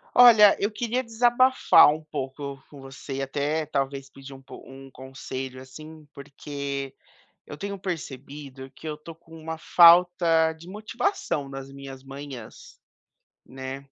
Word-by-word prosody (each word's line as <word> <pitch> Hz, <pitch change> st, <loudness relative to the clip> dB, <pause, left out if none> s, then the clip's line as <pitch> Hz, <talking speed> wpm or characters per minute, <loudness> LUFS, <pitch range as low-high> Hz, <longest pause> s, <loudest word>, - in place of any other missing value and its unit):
Olha, 220 Hz, -5 st, +8 dB
eu 205 Hz, +2 st, -1 dB
queria 240 Hz, +3 st, -2 dB
desabafar 240 Hz, -, +4 dB
um 155 Hz, +1 st, -8 dB
pouco 140 Hz, -2 st, -6 dB
com 140 Hz, -2 st, -13 dB
você 135 Hz, +1 st, -9 dB
e 135 Hz, -, -3 dB
até 145 Hz, +3 st, -2 dB
talvez 135 Hz, -2 st, -3 dB
pedir 135 Hz, 0 st, -12 dB
um 135 Hz, -, -13 dB, 0.2 s
um 135 Hz, 0 st, -13 dB
conselho, 130 Hz, 0 st, -8 dB
assim, 155 Hz, +4 st, -12 dB
porque 140 Hz, -1 st, -6 dB, 0.5 s
eu 145 Hz, -, -10 dB
tenho 200 Hz, +4 st, -6 dB
percebido 140 Hz, -6 st, -7 dB
que 150 Hz, -, -11 dB
eu 155 Hz, -, -4 dB
estou 160 Hz, +2 st, -12 dB
com 165 Hz, 0 st, -17 dB
uma 160 Hz, +1 st, -6 dB
falta 170 Hz, -1 st, +5 dB
de 160 Hz, +2 st, -15 dB
motivação 210 Hz, -, -3 dB
nas 135 Hz, 0 st, -8 dB
minhas 135 Hz, -1 st, -10 dB
manhãs, 135 Hz, -4 st, -11 dB, 0.7 s
né, 130 Hz, +1 st, -8 dB
145 Hz, 135 wpm, -25 LUFS, 135-170 Hz, 0.7 s, Olha